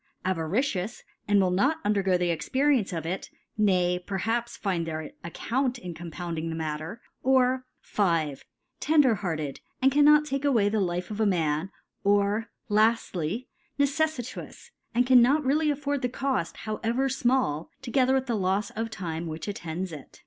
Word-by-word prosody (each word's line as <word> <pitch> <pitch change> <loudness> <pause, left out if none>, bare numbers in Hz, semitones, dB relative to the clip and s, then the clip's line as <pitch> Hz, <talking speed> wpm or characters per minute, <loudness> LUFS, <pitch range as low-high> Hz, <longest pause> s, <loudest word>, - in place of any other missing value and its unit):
Avaricious, 185 - -1 0.2
and 205 -1 +4
will 185 -2 +3
not 270 - +2
undergo 195 -3 +2
the 175 -1 +1
Expence 250 - +1
of 165 -3 -4
it, 180 +3 -3 0.3
nay 180 -4 +2
perhaps 225 +6 -2
find 180 -5 -1
their 160 -1 -3 0.2
Ac 170 - -8
count 255 +1 0
in 180 -8 -7
compounding 165 0 -5
the 160 - -3
Matter; 160 +7 -4 0.2
or, 255 0 +3
5. 165 -8 0 0.4
Tender 295 -5 +4
hearted, 160 -9 -3 0.2
and 265 +1 +4
cannot 295 +2 +6
take 275 -1 -2
a 285 - +3
way 210 -5 +3
the 215 +1 0
life 180 0 -2
of 210 - -5
a 220 - +3
Man 160 -3 +1 0.4
5 200 - +4
or, 205 +2 +1 0.2
Laftly, 215 -2 +1 0.3
Neceffitous, 285 -2 -2 0.2
and 245 +1 +4
cannot 260 +4 +5
really 300 +3 +2
afford 285 -1 -1
the 250 - 0
Coft, 260 -9 -2
however 230 +5 0
fmall, 250 - +1 0.2
together 260 +1 +2
with 265 -1 +1
the 245 - -1
Lofs 195 +1 0
of 225 +1 -2
Time 170 -5 -4
which 160 +3 -6
attends 180 -2 -4
it. 150 -4 -11
205 Hz, 160 wpm, -27 LUFS, 175-255 Hz, 0.4 s, cannot